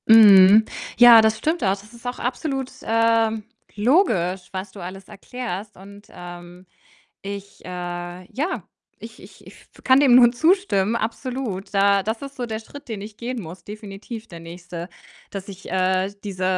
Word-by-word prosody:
Mhm. 210 -1 +8 0.3
Ja, 240 -1 +9
das 220 0 +2
stimmt 315 +1 -1
auch. 195 - +3
Das 200 +3 -4
ist 235 +1 -10
auch 245 - -4
absolut, 265 +1 -3
ähm, 225 -1 +2 0.3
logisch, 205 - +1
was 190 +1 -6
du 200 - -12
alles 185 +2 -8
erklärst, 215 -3 -7
und, 200 +2 -14
ähm, 175 +1 -11 0.6
ich 200 0 -8
äh, - - -9
ja, 180 - -5 0.3
ich - - -12
ich - - -16
ich - - -13 0.2
f - - -19
kann 260 +1 +5
dem 270 -4 +5
nur 240 -1 +7
zustimmen, 240 - +2
absolut. 230 -3 -4
Da 200 0 +3
das 220 +3 -3
ist 275 0 -8
so 245 -2 -4
der 220 -1 -4
Schritt, 275 +5 -13
den 220 -3 -5
ich 205 +1 -9
gehen 240 +1 -5
muss, 175 0 -10
definitiv 210 +2 -9
der 170 -5 -11
nächste, 170 +1 -9 0.4
dass 195 -1 -7
ich, 195 -1 -10
äh, 185 +1 0
diese 190 -2 -4
205 Hz, 165 wpm, -22 LUFS, 190-240 Hz, 0.6 s, Ja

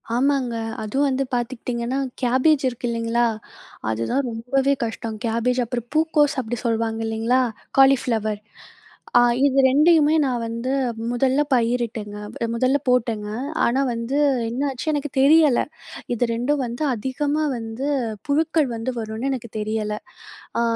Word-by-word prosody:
ஆமாங்க. 260 -2 +1 0.3
அதுவும் 270 +7 +1
வந்து 265 0 0
பார்த்துக்கிட்டீங்கன்னா, 240 +1 -2 0.2
கேபேஜ் 260 +4 +3
இருக்கு 245 0 -5
இல்லிங்களா? 230 +1 +1 0.7
அதுதான் 115 - -1
ரொம்பவே 265 +4 +1
கஷ்டம். 225 -1 -5
கேபேஜ் 240 +2 +1
அப்புறம் 240 0 -4
பூக்கோஸ் 310 -2 +3
அப்பிடி 240 0 -4
சொல்வாங்க 225 -1 0
இல்லேங்களா? 225 +3 +1 0.4
காலிஃப்ளவர் 230 -6 +3 0.8
அ - - +8 0.3
இது 275 -1 +3
2யுமே 305 +2 +5
நான் 250 -3 -1
வந்து 230 +3 -3 0.4
முதல்ல 260 +3 +2
பயிரிட்டேங்க, 230 -3 0 0.3
அ - - -2
முதல்ல 255 +4 +2
போட்டேங்க. 230 -4 +1 0.4
ஆனா, 245 +3 +2
வந்து 230 +3 -3 0.3
என்னாச்சு 260 +3 -3
எனக்கு 295 0 -2
தெரியல. 295 -1 +5 0.5
இது 240 - 0
2ம் 265 +5 0
வந்து 240 +5 -4
அதிகமா 285 +6 -1
வந்து, 225 +3 -5 0.4
புழுக்கள் 310 +1 +2
வந்து 230 +3 -3
வருன்னு 220 +4 -3
எனக்கு 240 -3 -4
தெரியல. 210 0 -2 0.6
அ - - +2
245 Hz, 125 wpm, -22 LUFS, 230-275 Hz, 0.8 s, அ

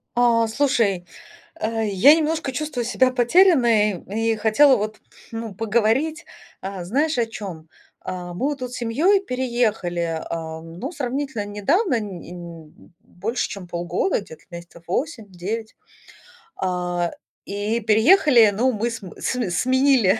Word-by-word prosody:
А, 235 -1 +4
слушай, 220 -8 +1 0.5
э, 225 0 -1
я 210 +10 +6
немножко 315 -3 -1
чувствую 265 -3 -3
себя 255 +2 +2
потерянной 240 - +4
и 225 +2 0
хотела, 245 +6 +5
вот, 215 +1 -3 0.4
ну, 225 -2 -5
поговорить. 225 - 0 0.4
А, 190 -1 -5
знаешь, 285 - 0
о 235 - +2
чём? 190 -8 -8 0.4
А 180 -1 -5
мы 175 - -8
вот 290 -1 -4
тут 250 -1 -5
семьей 285 - +2
переехали, 220 - -1
а, 160 -1 -5
ну, 170 - -7
сравнительно 265 -5 -3
недавно, 250 - +1
не 190 -5 -8
не 170 -3 -9 0.3
больше 225 +4 -3
чем 195 -3 -8
полгода, 175 +2 -1
где-то 160 -5 -13
месяцев 170 -1 -11
8-9. 215 - -4 0.8
А, 180 -2 -1 0.3
и 205 +3 -2
переехали, 230 - +5
ну, 255 +3 +3
мы 230 +1 -1
см 220 -6 -9
см 245 -8 -1
сменили, 255 -1 +3
225 Hz, 130 wpm, -22 LUFS, 185-255 Hz, 0.8 s, я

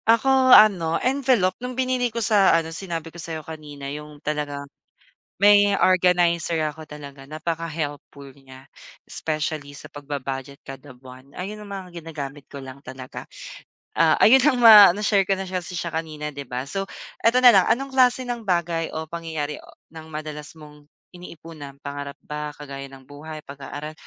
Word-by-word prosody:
Ako 260 +3 +4
ano 185 -9 +6
envelope, 255 -8 +1
nung 250 0 -6
binili 255 -1 0
ko 230 -1 -3
sa 200 -5 +5
ano 165 0 -3
sinabi 165 -2 -6
ko 175 - -9
sa'yo 160 -2 -6
kanina, 150 -3 -9
yung 150 0 -9
talagang 145 -1 -3 0.7
may 205 +1 +6
organizer 175 -2 +2 0.2
ako 160 - -11
talaga, 140 -2 -10
napaka-helpful 150 -2 -5
niya, 135 -1 -16 0.4
specially 155 -2 -4
sa - - -11
pagba-budget 140 -1 -6
kada 135 +1 -10
buwan. 130 +1 -14
Ayun 210 +4 -6
ang 205 - -11
mga 180 -4 -8
ginagamit 145 -3 -8
ko 140 - -8
lang 135 0 -10
talaga, 130 -1 -9 0.6
ah, 165 -1 +3
ayun 260 +5 +6
ang 270 -1 +3
ma 220 -5 +10
na-share 200 +1 +1
ko 195 - +2
na 190 - -4
siya 185 -1 -3
siya 175 -1 -5
kanina, 155 -2 -4
'di 140 -2 -8
ba? 125 +2 -4
So 195 +7 -4 0.3
eto 230 +2 +3
na 245 - +10
lang, 190 -3 +4
anong 270 +2 0
klase 255 -1 +3
ng 240 -1 -4
bagay 170 -4 -1
o 160 0 -5
pangyayari 160 -3 -5 0.3
ng 160 -1 -10
madalas 150 -1 -7
mong 150 -1 -15 0.2
iniipunan 165 -5 -11
pangarap 140 0 -6
ba, 150 0 -5
kagaya 140 -1 -8
ng 135 -1 -15
buhay, 150 +2 -10
pag-aaral 145 +2 -8
160 Hz, 160 wpm, -23 LUFS, 145-195 Hz, 0.7 s, ma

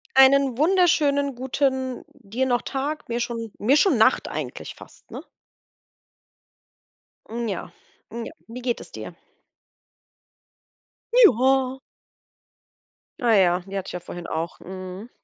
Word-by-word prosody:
Einen 270 -1 +5
wunderschönen 300 -5 +3
guten 260 0 -1
dir 250 0 -3
noch 245 -2 +1
Tag, 290 +3 -4
mir 235 0 -2
schon 230 -3 -4
mir 250 +7 +3
schon 385 - +4
Nacht - - +4
eigentlich - - -6
fast, - - -16
ne? - - -6 2.1
Hm, 235 0 -3
ja, 195 -4 -4 0.4
hm, 235 0 -5
ja, - - -8 0.2
wie 245 +2 -8
geht 240 -1 -1
es - - -12
dir? - - -8 2.0
Ja. 265 - +4 1.4
Ah 235 -2 +4
ja, 180 -3 +4
die 195 0 -6
hatte 195 - -4
ich - - -6
ja 180 - -5
vorhin 175 0 -8
auch. 160 +1 -4
Mhm. 185 +4 -8
250 Hz, 125 wpm, -24 LUFS, 215-275 Hz, 2.1 s, Einen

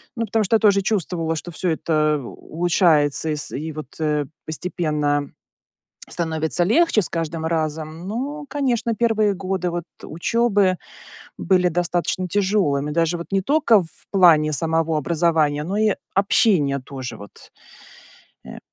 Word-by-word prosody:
Ну, 230 -1 -1
потому 220 +1 0
что 210 - +2
я - - +4
тоже 200 -2 +4
чувствовала, 175 -5 -1
что 175 +2 -6
всё 175 +3 -1
это 155 -2 +1
улучшается 160 - +1
и 155 - 0
с 145 - -5
и 155 +3 -4
вот, 155 0 -7
э, 150 -2 0 0.2
постепенно 150 -3 -1 0.8
становится 160 0 -1
легче 230 - +3
с - - +1
каждым 165 -1 -3
разом. 160 +1 -3
Ну, 285 +7 -4
конечно, 245 -5 -1
первые 215 -3 +1
годы 185 -1 -2
вот 175 0 -3 0.2
учёбы 200 +2 +1 0.6
были 180 -2 +2
достаточно 175 +1 -1
тяжёлыми, 185 -8 +1
даже 165 +2 +1
вот 170 - -7
не 195 -1 +2
только 275 - +4
в 165 - -11 0.2
плане 165 -6 +5
самого 160 +2 0
образования, 155 -2 +1
но 190 +5 -3
и 215 -1 +3 0.2
общения 185 -8 +2
тоже. 130 -1 -7
Вот, 100 0 -14 0.9
э. - - -9
170 Hz, 140 wpm, -21 LUFS, 155-200 Hz, 0.9 s, плане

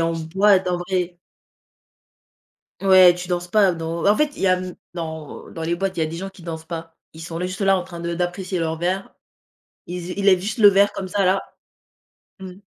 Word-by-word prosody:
en 165 0 +1
boîte, 190 +4 +2
en 180 -1 0
vrai. 175 -1 -2 1.6
Ouais, 185 -2 +7
tu 180 0 -7
danses 175 -1 -2
pas 195 0 +4
dans 165 0 -4
en 205 - +4
fait, 300 -1 +1
il - - -9
y 195 - +3
a, 185 0 +3
mmh, 185 -1 -7 0.2
dans 160 -3 -7
dans 165 - -7
les 165 +1 -1
boîtes, 190 +1 -2
il - - -4
y 160 - +3
a - - 0
des 165 +2 -6
gens 195 +2 -5
qui 195 - -17
dansent 160 -1 -7
pas. 165 -1 -7 0.2
Ils 160 - -11
sont 165 0 -6
là 180 - -2
juste 185 +2 -5
là 195 -1 +4
en 180 - -3
train 175 -1 -10
de 170 0 -3
d'apprécier 180 +2 -2
leur 160 -1 -1
verre. 185 +3 -2 0.7
Ils 180 +1 -5
z 175 - -8
ils 200 - -2
lèvent 185 -2 +5
juste 215 +4 -3
le 210 -3 +8
verre 200 +1 +4
comme 190 - -5
ça 200 +2 0
là. 190 +1 +3 1.0
Mmh. 190 -1 -8
180 Hz, 230 wpm, -22 LUFS, 170-190 Hz, 1.6 s, le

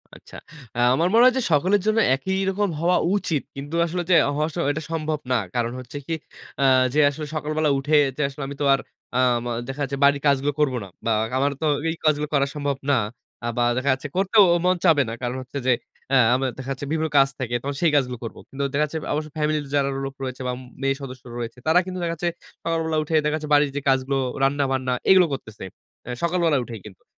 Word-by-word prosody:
আচ্ছা। - - -15 0.6
আমার 165 +5 +2
মনে 230 +2 +6
হয় 255 - +6
যে - - +1
সকলের 185 +7 +3
জন্য 215 +1 +3 0.2
একই 190 +8 -3
রকম 200 +1 0
হওয়া 175 +2 +3 0.2
উচিত। 165 -8 -1
কিন্তু 145 +4 -6
আসলে 175 +1 -2
যে 180 - +6 0.2
হওয়া 150 +1 +1
স - - -12 0.2
এটা 155 +2 -3
সম্ভব 155 -2 -2
না। 125 - +4 0.2
কারণ 120 -1 0
হচ্ছে 125 +3 -8
কি, 165 - -2 0.5
আ - - +3 0.3
যে 150 - +2
আসলে 150 +2 -6
সকালবেলা 155 0 0
উঠে 150 +3 +1 0.2
যে - - -1
আসলে 140 0 -7
আমি 140 - -6
তো - - +1
আর 135 - +2 0.4
আ - - +3 0.3
ম - - -3 0.2
দেখা 135 +2 -6
যাচ্ছে 140 0 -3
বাড়ির 140 0 +4
কাজগুলো 140 +1 +2
করব 145 -3 +2
না। 100 - -9 0.2
বা 115 - +1 0.3
আমার 140 +2 +2
তো - - 0 0.2
এই 165 - -1
কাজগুলো 150 -1 +2
করা 140 -1 +3
সম্ভব 145 -2 -1
না। 140 - +5 0.5
আ - - -2
বা 120 - +3
দেখা 130 +2 0
যাচ্ছে 130 +2 -5
করতেও 200 +2 +5
ও - - +3
মন 185 0 +4
চাবে 155 -5 +5
না। - - -4
কারণ 125 0 -2
হচ্ছে 130 +2 -8
যে - - +5 0.4
আ - - +6 0.2
আমার 130 0 0
দেখা 130 0 -7
যাচ্ছে 135 +1 -4
বিভিন্ন 160 0 0
কাজ 135 0 +6
থাকে, 120 -2 -2
তখন 140 +2 -4
সেই 170 - +4
কাজগুলো 125 -3 +1
করব। 115 - -7
কিন্তু 140 +1 -4
দেখা 145 +2 +2
যাচ্ছে 160 +2 -5
অবশ্য 155 +1 -3
ফ্যামিলি 150 0 +1
তে - - -13
যারা 140 -1 +2 0.2
লোক 135 0 -6
রয়েছে 130 0 -5
বা - - 0
ম - - -11 0.2
মেয়ে 135 0 +1
সদস্য 130 -2 -8
রয়েছে। 120 +1 -5
তারা 160 +3 +5
কিন্তু 185 0 -5
দেখা 165 -1 -1
যাচ্ছে 175 +2 -1 0.4
সকালবেলা 165 -1 0
উঠে 160 +2 -2
দেখা 150 0 +1
যাচ্ছে 150 -1 -7
বাড়ির 145 -1 +4
যে 145 - -2
কাজগুলো, 135 +1 +1 0.3
রান্না-বান্না 135 -2 +1 0.2
এগুলো 185 -1 +7
করতেছে 110 -5 -7 0.4
অ্যা 125 - -6
সকালবেলা 170 -3 +2
উঠেই 115 -4 -8
কিন্তু। 95 - -15
145 Hz, 225 wpm, -23 LUFS, 135-160 Hz, 0.6 s, এগুলো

